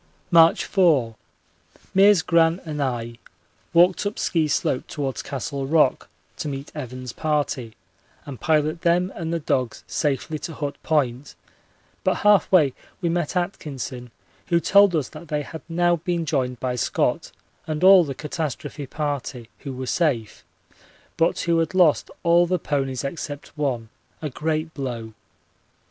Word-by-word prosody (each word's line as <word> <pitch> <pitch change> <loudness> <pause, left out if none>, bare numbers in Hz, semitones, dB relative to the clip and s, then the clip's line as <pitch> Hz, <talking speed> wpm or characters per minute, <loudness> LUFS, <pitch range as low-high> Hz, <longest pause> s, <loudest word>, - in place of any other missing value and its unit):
March 165 -1 +6
4. 145 - +3 0.8
Meares, 195 -2 +6
Gran, 165 0 +3
and 150 -2 -4
I 120 -3 -3 0.5
walked 175 +2 +4
up 205 - -5
Ski 160 -3 +1
Slope 130 -2 0
towards 140 -3 -3
Castle 135 0 -4
Rock 150 -3 +2 0.3
to - - -4
meet 140 0 -5
Evans's 130 -4 -6
party 145 -7 -2 0.5
and 135 -4 -8
pilot 155 +1 +1
them 175 +2 +2
and 165 -1 -4
the 170 - 0
dogs 130 -6 -2
safely 150 +1 -2
to 160 - -6
Hut 145 -1 -3
Point, 135 -3 -1 0.7
but - - +2
half 210 -1 +5
way 155 -8 +5 0.3
we 175 -3 -1
met 170 0 -1
Atkinson, 140 -8 -4 0.4
who 170 - +3
told 200 +1 +5
us 150 -5 -1
that 155 +2 -11
they 150 -1 -2
had 160 +2 -9
now 175 +1 +2
been 170 0 -2
joined 130 -5 -1
by 125 -1 -2
Scott - - 0 0.4
and 155 +1 -3
all 190 -1 +8
the 140 -4 -5
catastrophe 150 -1 -5
party, 140 -5 -4
who 140 - -6
were 130 0 -5
safe, 130 -7 -1 0.7
but 165 +1 +1
who 170 -1 +2
had 165 +3 -1
lost 175 -5 +4
all 170 +1 +4
the 180 +1 +1
ponies 135 -5 -2
except 145 0 -6
one 130 -7 -2 0.3
a 150 -3 -4
great 155 +3 -2
blow. 120 -5 -5
150 Hz, 150 wpm, -23 LUFS, 135-170 Hz, 0.8 s, all